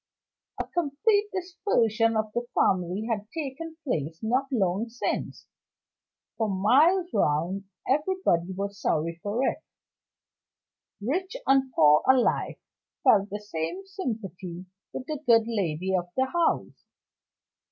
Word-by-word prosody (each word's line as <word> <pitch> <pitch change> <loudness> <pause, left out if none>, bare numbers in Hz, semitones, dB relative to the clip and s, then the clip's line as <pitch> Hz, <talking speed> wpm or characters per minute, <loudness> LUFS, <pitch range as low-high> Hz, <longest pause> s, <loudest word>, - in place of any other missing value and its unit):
A - - -1
complete 350 +7 +1
dispersion 240 - +1
of 215 -1 -2
the 240 0 -2
family 185 +2 +1
had 210 -3 -2
taken 320 +1 -5
place 160 - -2
not 255 +5 +1
long 205 -1 0
since. 240 +2 -3 0.9
For 220 -2 0
miles 300 - +3
round 170 +7 +1 0.2
everybody 285 - +1
was 200 +1 -5
sorry 165 +2 0
for 225 +6 0
it. - - -2 1.4
Rich 370 - -2
and 270 -1 +3
poor 150 -1 +6
alike 260 -2 +3 0.4
felt 200 -1 +5
the 205 - -4
same 210 - -4
sympathy 195 - -5 0.3
with 255 - -6
the 305 0 -4
good 230 -1 +6
lady 190 -5 -1
of 175 -1 -1
the 260 - +3
house. 335 +4 -1
225 Hz, 120 wpm, -27 LUFS, 190-295 Hz, 1.4 s, poor